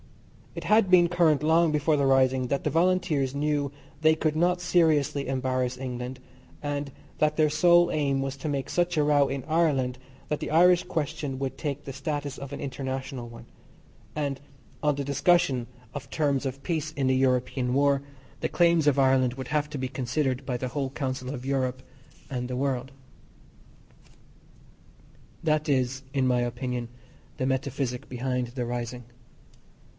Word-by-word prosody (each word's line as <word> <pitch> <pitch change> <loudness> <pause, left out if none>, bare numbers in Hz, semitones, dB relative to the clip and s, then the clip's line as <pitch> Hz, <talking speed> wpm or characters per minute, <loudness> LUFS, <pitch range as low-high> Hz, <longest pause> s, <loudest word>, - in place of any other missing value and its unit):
It - - -5
had 215 -3 +4
been 180 -2 +6
current 165 -4 +3
long 165 +1 +4
before 150 +1 +2
the 140 -2 +2
rising 130 -1 +3
that 140 +2 -1
the - - +2
Volunteers 165 -5 +1
knew 145 -1 0 0.3
they 155 0 +5
could 155 -1 0
not 175 +2 +2
seriously 155 -6 +2
embarass 130 -1 -1
England, 125 0 -5 0.4
and 145 -1 -3 0.3
that 150 0 +2
their 155 -2 +3
sole 175 +2 +5
aim 140 -3 +1
was 135 0 -2
to 145 +3 -4
make 140 -2 -2
such 175 -1 0
a 150 - +4
row 145 -1 +3
in 135 -1 -4
Ireland 145 -6 +1 0.3
that 150 - -2
the - - -4
Irish 175 +3 +5
question 150 -5 -3
would 135 -1 -3
take 145 -1 -4
the 135 - -6
status 145 0 -4
of 140 0 -8
an 140 - -6
international 130 -2 -5
one, 115 0 -12 0.7
and 140 -2 -2 0.4
on 150 -1 +3
the 140 0 -3
discussion 140 -4 +2 0.3
of 145 - -7
terms 145 -3 0
of 135 +1 -6
peace 155 -3 -2
in 140 -4 0
the 130 - +3
European 125 -1 +1
war 140 0 +3 0.4
the - - 0
claims 170 -3 +3
of 140 -1 +4
Ireland 130 -2 +3
would 130 -1 -7
have 150 0 0
to 150 - -5
be 130 -1 -2
considered 130 +1 -2
by 125 -2 -2
the 130 +1 -3
whole 135 +1 -2
Council 130 -1 -4
of 125 -2 -7
Europe 130 -2 -1 0.5
and 125 -2 -3
the 125 - -3
world. 130 -1 -1 2.5
That 155 -1 +1
is, 130 -1 +1
in 135 -2 +1
my 125 -1 +2
opinion, 120 0 -3 0.5
the 130 - -1
metaphysic 130 -1 -2
behind 125 0 -2
the 120 +1 -4
rising. 120 +1 -4
140 Hz, 165 wpm, -27 LUFS, 130-150 Hz, 2.5 s, been